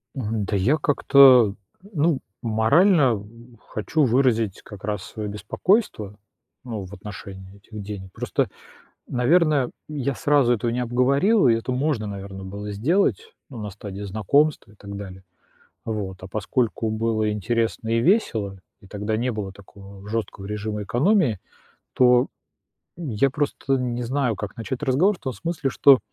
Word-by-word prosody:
Мгм. 110 -5 -2
Да 100 - -2
я 110 +11 +3
как-то, 135 -7 +6 0.4
ну, 155 -5 +1 0.2
морально 120 - +3 0.5
хочу 145 +8 0
выразить 115 -5 +2
как 105 -3 -12
раз, 105 -2 -2
свое 105 -2 -6
беспокойство, 105 - 0 0.5
ну, 115 -5 -5
в 95 - -12
отношении 95 -1 -9
этих 105 +1 -10
денег. 100 -2 -7
Просто, - - -1 0.6
наверное, 145 +1 +3 0.2
я 140 -2 -2
сразу 140 -2 +3
этого 115 +1 -1
не 120 +2 -1
обговорил, 135 - +3
и 115 - +5
это 115 +3 -2
можно, 130 -4 0
наверное, 100 -1 -7
было 100 +2 -6
сделать, 190 - 0 0.2
ну, 130 - -9
на 105 - -5
стадии 100 0 -8
знакомства 110 +7 +1
и - - -19
так 100 0 -9
далее, 95 -2 -9 0.6
вот. 105 -4 -4
А 95 - -8
поскольку 110 +2 -1
было 110 -1 0
интересно 115 +2 -1
и 115 0 +2
весело 115 - +1 0.2
и - - -16
тогда 105 +2 -3
не 125 +3 -1
было 105 -3 -5
такого 100 0 -14
жёсткого 105 -3 -4
режима 105 0 -4
экономии, 125 - +2 0.5
то 125 0 +5 0.7
н 170 -3 -6
я 115 +5 +2
просто 140 -1 -1
не 125 -1 -2
знаю, 125 -2 0
как 105 +3 -6
начать 125 +3 -5
разговор 150 +9 +3
в - - -28
том 130 - -3
смысле, 165 -2 -3
что 135 0 +6
115 Hz, 150 wpm, -23 LUFS, 105-135 Hz, 0.7 s, как-то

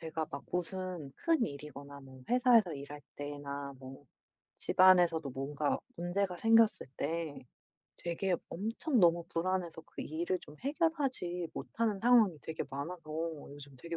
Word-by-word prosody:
제가 160 -1 -3
막 140 - -6
무슨 180 -3 -3
큰일이거나 140 - -2
뭐 130 -1 -13
회사에서 240 - +5
일할 145 +1 -8 0.2
때나 145 -1 -5
뭐 135 +2 -11 0.5
집안에서도 175 -5 +5
뭔가 140 +3 -1 0.2
문제가 180 +1 -1
생겼을 225 +2 +4
때 160 0 -2 0.6
되게 175 +2 -1 0.2
엄청 230 - -1
너무 170 -1 +5
불안해서 175 -1 -1
그 - - -7
일을 170 +4 -1
좀 150 - -13
해결하지 275 - 0
못하는 225 -3 -1
상황이 225 -8 +5
되게 160 - -4
많아서 155 +6 -5 0.5
요즘 140 -1 -11
되게 170 +5 -5
170 Hz, 290 characters per minute, -33 LUFS, 145-195 Hz, 0.6 s, 회사에서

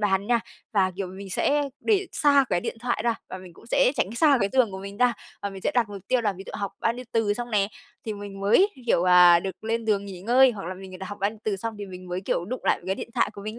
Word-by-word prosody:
bàn 200 -1 +1
nha. 235 0 +2 0.3
Và, 190 -3 +3
kiểu, 195 -2 -3
mình 190 +1 -9
sẽ 280 +7 +2 0.2
để 400 -3 +2
xa 290 -3 +4
cái 175 - +2
điện - - -4
thoại 240 -2 -1
ra, 235 -1 +2
và 185 - -6
mình 185 -2 -12
cũng 170 - -18
sẽ 250 - +3
tránh 195 - 0
xa 295 -1 +5
cái 200 - +2
giường 255 -5 +3
của 190 - -6
mình 200 +1 -8
ra. 250 0 +3 0.3
Và 200 - -2
mình 195 -1 -9
sẽ - - +1
đặt 235 -4 +2
mục 200 -2 -8
tiêu 255 -1 +3
là 210 -3 0
ví 190 +1 -10
dụ - - -8
học 200 -1 -3
bao 230 - +2
nhiêu 250 +1 -8
từ 225 -1 +1
xong 240 0 -5
nè, 200 -2 +2 0.4
thì 220 - -3
mình 200 -1 -8
mới, 220 - +4 0.2
kiểu, 175 -6 +3
à, 175 -1 +8
được 190 +3 -7
lên 225 0 -1
giường 205 -2 +1
nghỉ 190 -3 -8
ngơi. 250 +5 +5
Hoặc 205 -6 -7
là 185 - -4
mình 185 0 -10
đã 190 - -6
học 205 +1 -7
bao 200 - +2
nhiêu 220 - -14
từ 210 -2 0
xong 225 +3 -4
thì 205 - -6
mình 185 -1 -10
mới, 180 +1 -3
kiểu, 180 -2 -1
đụng 250 +7 -6
lại - - +2
cái 190 - 0
điện - - -7
thoại - - +2
của 200 - -9
mình 215 +2 -6
205 Hz, 300 wpm, -25 LUFS, 190-235 Hz, 0.4 s, à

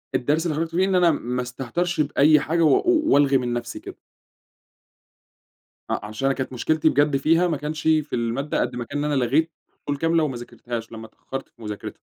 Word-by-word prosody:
الدرس 150 +6 +1
اللي 160 -3 -1
خرجت 165 +1 -3
بيه 185 +2 +3
إن 190 -1 0
أنا 175 -2 +5
ما 125 -4 -2
استهترش 135 +8 -2
بأي 150 +1 +4
حاجة 165 +4 -1
و 150 -4 +4
وألغي 145 - +4
من 125 -2 -2
نفسي 120 -1 -4
كده. - - -10 1.9
ع - - -2
عشان 110 +5 -5
أنا 135 0 +2
كانت 130 -1 -4
مشكلتي 155 +5 +1
بجد 145 -1 +2
فيها 165 +5 +3
ما 165 -4 -1
كانش 150 +2 -5
في 155 -2 +1
المادة، 120 +5 -1
قد 125 - -2
ما 120 - -3
كان 145 - -5
إن 150 - -1
أنا 135 -3 +1
لغيت 155 +7 +1 0.3
فصول 145 -1 -2
كاملة 165 +2 +2
وما 135 -5 -2
ذاكرتهاش، 120 -1 -7
لما 110 -1 -8
اتأخرت 135 +4 -8
في 120 - -23
مذاكرتها. 105 -2 -7
145 Hz, 200 wpm, -23 LUFS, 125-160 Hz, 1.9 s, أنا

